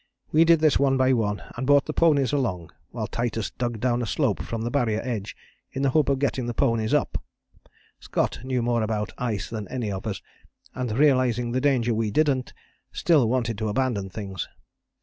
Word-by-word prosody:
We 160 +2 +5
did 165 -1 +5
this 155 -2 +4
one 135 -1 +3
by 130 0 +3
one 105 -4 -1
and 130 +2 -3
brought 145 -1 +5
the 155 - -4
ponies 145 -7 +3
along, 95 - -1 0.2
while - - -4
Titus 115 -2 -2
dug 120 -3 -3
down 120 +1 +1
a 120 - -2
slope 130 -4 0
from 115 -1 -4
the 120 - -2
Barrier 120 -6 +1
edge 110 -5 -4 0.4
in 135 - -2
the 135 - +3
hope 150 0 +3
of 140 - +2
getting 130 -2 -1
the 120 - -3
ponies 115 -4 +1
up - - +1 0.5
it. - - -46 0.3
Scott - - -1
knew 130 -2 -1
more 120 -1 +1
about 110 -1 -2
ice 115 -5 -2
than 110 -3 -5
any 120 -5 -3
of 95 -1 -5
us, - - -4 0.5
and 125 -3 -3
realizing 125 -2 +2
the 130 +2 0
danger 125 -4 +2
we 110 -1 0
didn't, 135 +1 +1 0.4
still 150 -10 +3
wanted 115 -4 -1
to 110 -1 -1
abandon 105 -4 -1
things. 95 -2 -5
120 Hz, 200 wpm, -25 LUFS, 110-135 Hz, 0.5 s, We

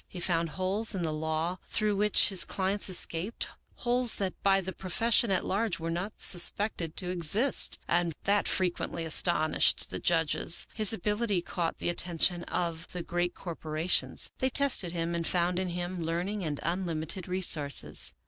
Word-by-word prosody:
He 180 - -9
found 170 -2 0
holes 195 +6 -2
in 180 - -2
the 160 -2 -1
law 160 +3 -2
through 215 -2 0
which 210 +1 +4
his 190 -3 +2
clients 195 +1 -1
escaped, 180 +3 +2 0.3
holes 245 -1 0
that 190 -2 -2
by 195 -1 +3
the 190 0 -5
profession 225 +5 +2
at 190 - +1
large 200 -2 -1
were 165 0 -3
not 180 +5 -3
suspected 175 -2 +1
to 180 -1 0
exist, 185 - 0
and 170 0 +1
that 200 +1 +1
frequently 175 -2 -1
astonished 160 -1 +2
the - - -4
judges. 165 0 +1
His 215 -3 +3
ability 210 -2 -1
caught 170 -2 -3
the - - -2
attention 175 0 +1
of 170 -1 -3
the 180 -1 -4
great 175 +1 -2
corporations. 160 -1 -1
They 260 - +1
tested 260 -10 +4
him 170 0 -3
and 170 -1 -2
found 175 0 0
in 190 - -2
him 175 +1 -4
learning 175 +5 -3
and 150 -3 -3
unlimited 170 0 -2
resources. 170 -6 +1
180 Hz, 160 wpm, -29 LUFS, 170-195 Hz, 0.3 s, which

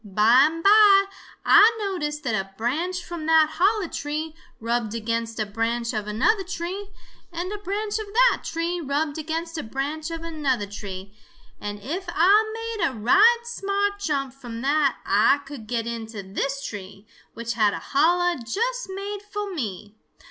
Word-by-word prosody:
By 220 +7 +5
and 330 +1 -5
by 400 -1 +7 0.4
Ah 420 +1 +8
noticed 325 -8 -3
that 245 -5 -1
a 195 -2 -3
branch 335 +10 -2
from 340 -3 -6
that 320 -1 +5
holler 400 +1 +3
tree 305 +1 -4 0.3
rubbed 230 -1 -2
against 230 0 -3
a 215 - +1
branch 230 +3 -2
of 210 -1 -3
another 385 - +2
tree, 375 +2 -5 0.4
and 350 +3 -4
a 420 - -5
branch 410 +2 -2
of 435 - -5
that 485 +4 +3
tree 335 +2 -2
rubbed 290 +1 -2
against 325 +1 -4
a - - -2
branch 285 +7 -4
of 330 0 -6
another 290 -9 -1
tree, 195 -1 -8 0.5
and 205 0 -5
if 350 - -4
Ah 380 +6 +5
made 455 -2 -4
a 265 - -4
right 420 - +5
smart 405 -3 -2
jump 275 -8 -2
from 240 -4 -8
that 285 -1 +2
Ah 250 +8 +3
could 275 -6 -9
get 230 -1 -2
into 225 -3 -6
this 275 +8 -3
tree, 195 0 -8 0.3
which 230 0 -3
had 215 -3 +2
a - - -5
holler 345 +3 +3
just 475 - -2
made 400 +2 -5
fo' 415 -1 -5
me. 210 - -5
305 Hz, 165 wpm, -24 LUFS, 230-385 Hz, 0.5 s, Ah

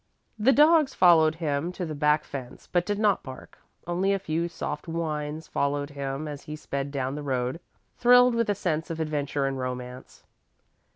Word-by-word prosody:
The 235 +6 +5
dogs 300 +1 +5
followed 160 -3 +5
him 160 0 -2
to 180 - -4
the 155 - -5
back 150 +1 +2
fence, 130 -3 -8
but 175 -1 0
did 205 -1 0
not 210 -2 +2
bark. 130 -1 -11 0.3
Only 180 +3 +1
a - - +1
few 170 -3 -2
soft 150 -2 -5
whines 155 -1 -3
followed 145 +1 -1
him 140 +1 -4
as 145 -1 -6
he 150 - -7
sped 140 -2 -4
down 135 -2 -2
the 150 - -5
road, 130 0 -2 0.4
thrilled 245 0 +6
with 230 -2 0
a 205 - +2
sense 165 -4 -2
of 165 -1 -4
adventure 145 -3 -1
and 135 -1 -2
romance. 125 0 -6
155 Hz, 180 wpm, -26 LUFS, 140-180 Hz, 0.4 s, thrilled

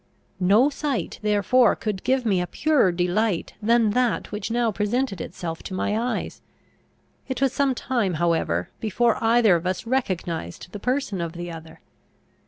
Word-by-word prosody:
No 210 +10 +4
sight 275 - -3
therefore 215 +4 +3
could 210 -4 -4
give 260 0 +1
me 195 -5 +2
a 180 - -3
purer 290 - +2
delight 180 +2 0
than 225 0 +3
that 250 +1 0
which 210 +2 -4
now 235 0 +1
presented 210 -1 -1
itself 165 -2 -6
to 190 - -6
my 205 +2 -1
eyes. 240 +3 -3 0.9
It 260 - -3
was 270 -1 +2
some 275 -2 +1
time 235 -9 -1
however, 160 - 0
before 225 +2 +1
either 225 -4 +5
of 170 +2 -2
us 185 +3 -2
recognised 180 - -3
the 205 - -7
person 250 -5 -1
of 165 -1 -4
the 175 0 -6
other. 160 0 -11
210 Hz, 160 wpm, -24 LUFS, 180-245 Hz, 0.9 s, either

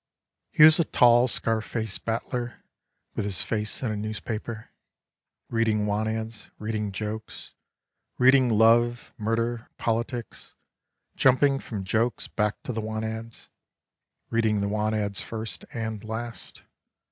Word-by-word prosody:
He 150 - +5
was 155 +1 +9
a - - +5
tall 120 -4 +5
scar 115 -2 +1
face 110 -1 -3
battler 120 +1 -3 0.5
With - - -2
his 100 -4 -1
face 105 +2 -2
in 115 - 0
a - - -2
newspaper 110 +1 -5 0.8
Reading 110 -2 +1
want 105 +1 0
ads, 110 0 -5
reading 105 -1 -3
jokes, 105 +2 -6 0.6
Reading 130 0 +5
love, 115 +2 +3
murder, 115 +2 -1
politics. 115 +1 -3 0.6
Jumping 135 +1 +4
from 105 -7 -6
jokes 110 +3 0
back 105 -1 -1
to 125 - -4
the 110 - -2
want 110 0 -3
ads, 110 +1 -7 0.8
Reading 110 -2 +2
the 100 - 0
want 110 +1 0
ads 100 -2 -1
first 110 -1 -5
and 110 -2 -4
last. 110 -1 -6
110 Hz, 130 wpm, -26 LUFS, 110-120 Hz, 0.8 s, was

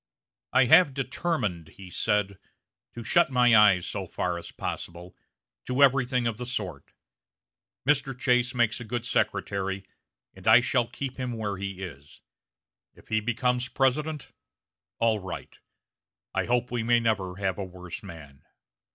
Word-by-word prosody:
"I 130 - +5
have 140 +2 +6
determined," 130 - -2
he 90 +3 -13
said, 105 -2 0 0.6
"to 120 - -6
shut 170 +9 +3
my 125 -3 +5
eyes, 100 -4 +6
so 95 -3 -4
far 85 0 -2
as - - -10
possible, 85 +1 -6 0.5
to 130 +2 +2
everything 125 -2 +3
of 115 -2 -1
the 125 - -5
sort. 95 - -5 0.9
Mr. 135 -3 +1
Chase 125 0 +1
makes 120 -2 +1
a - - -6
good 120 +1 -4
secretary, 95 -4 -1 0.5
and - - -12
I - - +9
shall 120 0 +1
keep 135 0 -6
him 125 -2 -3
where 105 -4 -3
he 95 -1 -5
is. 75 -5 -10 0.7
If - - -20
he 110 - +2
becomes 125 +3 0
President, 150 +3 0 0.7
all 115 -2 +2
right. 95 -2 -8 0.7
I - - 0
hope 125 +1 0
we 120 -2 -1
may 120 +1 +3
never 100 -6 -1
have 95 -1 -2
a - - -2
worse 90 -1 -8
man." 70 -5 -12
115 Hz, 150 wpm, -27 LUFS, 95-125 Hz, 0.9 s, I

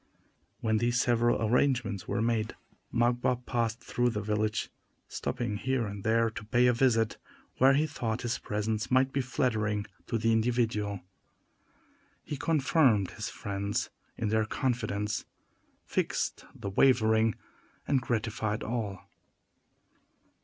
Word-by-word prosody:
When 110 -1 +2
these 120 +1 +1
several 120 -1 +3
arrangements 120 -5 +1
were 110 - 0
made, 115 -2 0 0.4
Magua 120 +1 +1
passed 115 -1 -1
through 120 0 +1
the 110 -3 -2
village, 105 0 -1 0.4
stopping 105 - -3
here 130 0 0
and 100 -1 -6
there 115 0 +2
to 105 -1 -7
pay 120 +3 +3
a 125 - +5
visit 115 -3 +2 0.4
where 135 +1 +6
he 150 +2 +3
thought 120 -6 -3
his 120 - -1
presence 105 +1 -2
might 130 +1 +3
be 135 - +1
flattering 110 -5 0 0.2
to 115 - 0
the 115 +1 +2
individual. 110 -4 0 1.2
He 150 - -4
confirmed 135 - +3
his - - -5
friends 100 0 -3 0.3
in 110 - -1
their 110 0 +2
confidence, 110 -4 -1 0.6
fixed - - -1
the 100 - -5
wavering, 110 -2 +4 0.5
and 135 -3 +2
gratified 110 -2 -1
all. 110 -5 -3
115 Hz, 125 wpm, -30 LUFS, 105-125 Hz, 1.2 s, where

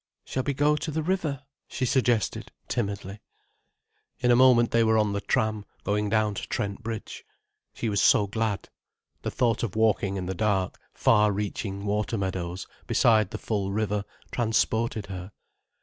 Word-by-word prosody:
"Shall 130 - -2
we 140 +1 -2
go 150 +2 +3
to 150 - -4
the 155 +1 -2
river?" 155 -6 -1 0.2
she 130 - -2
suggested, 120 -4 +1 0.2
timidly. 100 -3 -3 1.0
In 125 - +2
a - - +6
moment 125 -2 +5
they 115 0 +4
were 110 0 +3
on 105 -2 +2
the 100 - -2
tram, 110 -2 0 0.2
going 105 +1 0
down 110 -1 +2
to - - -5
Trent 100 +2 -3
Bridge. 115 -1 -6 0.5
She 115 - -2
was 100 -2 +1
so 105 - +5
glad. 110 -1 -2 0.5
The - - -2
thought 120 -3 +1
of 115 -5 -3
walking 105 -3 +2
in 90 - -3
the 95 - -2
dark, 95 -2 0
far 105 -1 +4
reaching 100 0 -3
water 105 +2 0
meadows, 95 -2 -3 0.2
beside 110 -4 +4
the 110 - -5
full 100 -3 -2
river, 105 -1 -1 0.3
transported 110 -2 0
her. 95 0 -7
110 Hz, 165 wpm, -27 LUFS, 100-115 Hz, 1.0 s, a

